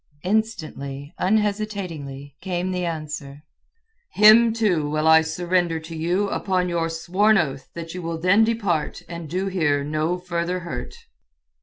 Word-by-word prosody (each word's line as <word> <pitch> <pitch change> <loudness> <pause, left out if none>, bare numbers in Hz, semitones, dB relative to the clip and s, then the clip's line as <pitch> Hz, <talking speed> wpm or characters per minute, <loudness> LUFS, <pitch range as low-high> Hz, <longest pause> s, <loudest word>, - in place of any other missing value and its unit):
Instantly, 160 -9 -2
unhesitatingly, 190 -10 -2
came 185 -1 -2
the 180 -1 -2
answer—"Him, 210 - +1
too, 190 -10 +1
will 155 +1 0
I 160 0 +7
surrender 170 +1 0
to 165 +1 -9
you 175 +5 0
upon 185 -2 0
your 165 -1 0
sworn 185 +6 +2
oath 135 -6 -2
that 165 -1 -6
you 180 - -5
will 165 -1 -3
then 185 +6 +4
depart 200 -9 -1
and 170 -2 -7
do 185 +4 -1
here 155 -7 +1
no 155 +4 -1
further 180 0 -3
hurt." 125 -8 -6
175 Hz, 135 wpm, -23 LUFS, 155-195 Hz, -, I